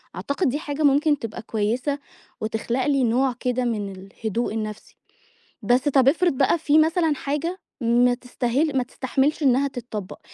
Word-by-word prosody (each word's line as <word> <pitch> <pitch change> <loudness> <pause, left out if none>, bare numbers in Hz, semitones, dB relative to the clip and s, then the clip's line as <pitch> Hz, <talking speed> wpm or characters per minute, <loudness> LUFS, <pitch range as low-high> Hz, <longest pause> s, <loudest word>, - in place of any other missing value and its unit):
أعتقد 280 +1 -1
دي 290 +4 -2
حاجة 295 0 -3
ممكن 290 +1 +3
تبقى 230 0 -6
كويسة 235 +7 -1 0.4
وتخلَق 230 +4 -1
لي 275 -3 +2
نوع 250 +2 +2
كده 250 0 -1
من 210 -4 -2
الهدوء 205 +4 -4
النفسي. 215 -1 -6 0.6
بس 245 +7 +2
طَب 265 -2 +4
افرِض 345 +1 +2
بقى 270 +5 +2
في 305 0 +4
مثلًا 320 0 +3
حاجة 300 +7 -3 0.2
ما 240 +1 +4
تستاهِل 255 +4 -1
ما 255 - +2
تستحمِلش 270 +4 -1
إنها 270 +1 +3
تتطبّق، 225 -7 -7
255 Hz, 150 wpm, -23 LUFS, 235-290 Hz, 0.6 s, طَب